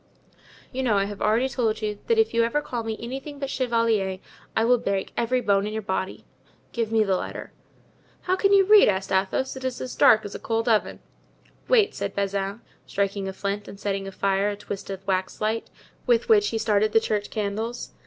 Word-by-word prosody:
"You 265 - -3
know 230 -6 +2
I 195 - +3
have 205 0 -7
already 225 +5 +2
told 230 -5 -1
you 210 -1 -2
that 460 - +3
if 445 0 +3
you 230 - +3
ever 235 +6 +1
call 245 -5 -4
me 220 -1 -4
anything 270 +5 -6
but 275 -1 -4
chevalier 230 -6 +1 0.4
I 225 - +3
will 245 +1 +4
break 195 -2 -2
every 250 +2 +1
bone 200 -2 +2
in 210 - -5
your 220 0 -3
body. 190 -1 -3 0.5
Give 230 -2 -2
me 220 -1 +4
the 195 -2 +1
letter." - - -5 0.7
"How 370 - +1
can 395 +1 +2
you 395 -1 +6
read?" 420 +1 +7
asked 195 0 -2
Athos, 195 +8 0
"it 260 - -8
is 260 -1 -3
as 255 - -5
dark 220 -1 +5
as 205 - -6
a - - -6
cold 225 0 -1
oven." 220 -3 +1 0.7
"Wait," 445 -5 +4
said - - -4
Bazin, 200 +2 -2 0.3
striking 200 0 -1
a 190 - -4
flint, 200 +1 -3
and 200 - -10
setting 195 -1 -2
afire 195 +1 0
a 205 - -3
twisted 195 -1 -7
wax 185 -1 -1
light, 220 +1 -1 0.4
with 485 0 +3
which 420 -3 +5
he 225 - -1
started 215 -1 +1
the 225 - +6
church 210 -2 -2
candles. 220 +3 -3
220 Hz, 205 wpm, -25 LUFS, 200-250 Hz, 0.7 s, read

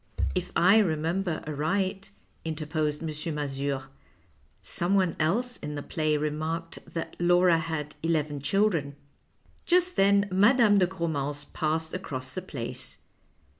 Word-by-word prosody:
" - - -4
" - - -6
If 180 - -14
I 190 +5 +6
remember 170 -1 0
aright," 190 +6 -1 0.3
interposed 155 -1 -2
M. 155 0 -4
Mazure, 140 -2 -2 0.5
" 70 +1 -37 0.2
someone 185 -1 +2
else 230 +11 +1
in 150 0 -6
the 145 - -4
play 155 -2 0
remarked 155 +3 -3
that 165 - -5
Laura 175 -1 +4
had 160 -2 -4
eleven 155 -3 0
children." 155 -2 +1 0.7
Just 360 0 +3
then 200 +1 +4
Mme. 205 +2 +5
dc 180 - +4
Gromance 150 -5 -2
passed 160 +1 -1
across 130 -8 -4
the 185 - -3
Place. 140 -10 -6
160 Hz, 130 wpm, -28 LUFS, 150-190 Hz, 0.7 s, I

